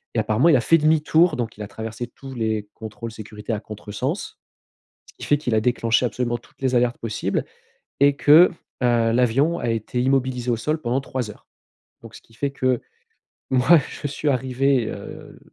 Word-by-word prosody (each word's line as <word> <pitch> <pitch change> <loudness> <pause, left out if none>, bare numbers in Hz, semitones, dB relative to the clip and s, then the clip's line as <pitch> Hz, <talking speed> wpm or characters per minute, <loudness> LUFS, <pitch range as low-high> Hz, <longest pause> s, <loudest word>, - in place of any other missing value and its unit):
et - - +2
apparemment, 120 +10 +3
il 150 - +6
a - - +1
fait 165 +7 +4
demi-tour, 155 +2 +3
donc, 115 -3 -4
il 105 - -6
a - - -6
traversé 110 +2 -6
tous 135 +1 -11
les 110 -2 -2
contrôles 110 +1 -7
sécurité 110 0 -7
à 105 - -2
contresens, 105 -1 -5 0.7
ce - - -17
qui - - -7
fait 145 - +2
qu'il 125 -6 -2
a 110 - +3
déclenché 115 0 +1
absolument 120 +1 -2
toutes 120 - -25
les 130 -1 +1
alertes 120 0 +2
possibles 115 -2 -2 0.6
et 140 0 +5
que, 155 +6 +7 0.3
heu, 120 -2 +3
l'avion 125 +8 +2
a 120 - -2
été 115 +2 -2
immobilisé 130 -2 0
au 115 - +2
sol 155 +7 -1
pendant 125 +1 -1
3 130 -4 -4
heures. - - -15 0.5
Donc, 115 -1 -12
ce - - -11
qui 115 - -24
fait 140 +4 -2
que, 130 -3 0 0.7
moi, 135 +6 +5
je - - -5
suis 145 +2 -3
arrivé, 130 -1 +1
heu, - - -10
125 Hz, 190 wpm, -22 LUFS, 115-135 Hz, 0.7 s, que